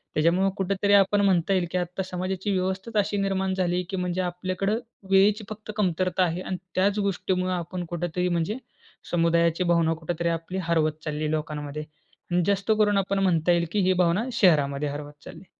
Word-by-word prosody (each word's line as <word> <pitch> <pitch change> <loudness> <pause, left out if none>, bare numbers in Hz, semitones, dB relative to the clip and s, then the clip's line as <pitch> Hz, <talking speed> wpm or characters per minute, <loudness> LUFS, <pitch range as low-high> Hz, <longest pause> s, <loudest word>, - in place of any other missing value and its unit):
त्याच्यामुळे 175 +5 +3
कुठेतरी 200 +1 +1
आपण 200 +1 +5
म्हणता 190 -2 +2
येईल 185 -2 +2
की 185 - 0
आत्ता 180 +2 -2
समाजाची 185 +2 -3
व्यवस्थाच 190 +4 -2
अशी 205 0 +1
निर्माण 190 -1 0
झाली 180 -2 0
आहे 180 - 0
की 190 - -3
म्हणजे 180 0 -1
आपल्याकडे 185 +3 -2 0.4
वेळेची 200 +3 +4
फक्त 215 0 -7
कमतरता 185 -1 +1
आहे 175 +1 -1
आणि 185 - -4 0.2
त्याच 200 +3 +2
गोष्टीमुळे 185 -2 -1
आपण 175 +1 -4
कुठेतरी 175 +1 -2
म्हणजे 170 +6 -1 0.5
समुदायाची 170 0 +2
भावना 170 -2 +2
कुठेतरी 170 +1 -2
आपली 165 +3 -3
हरवत 160 -2 +2
चाललीय 150 0 -2
लोकांमध्ये. 150 -1 -3 0.5
आणि 175 0 +3
जास्त 200 +2 +1
करून 205 -1 +3
आपण 195 0 0
म्हणता 175 -3 +2
येईल 170 0 +2
की 210 - 0
ही 185 - +4
भावना 180 +4 +2
शहरामध्ये 150 -8 +3
हरवत 145 +1 -6
चालली. - - -11
180 Hz, 175 wpm, -25 LUFS, 170-195 Hz, 0.5 s, आपण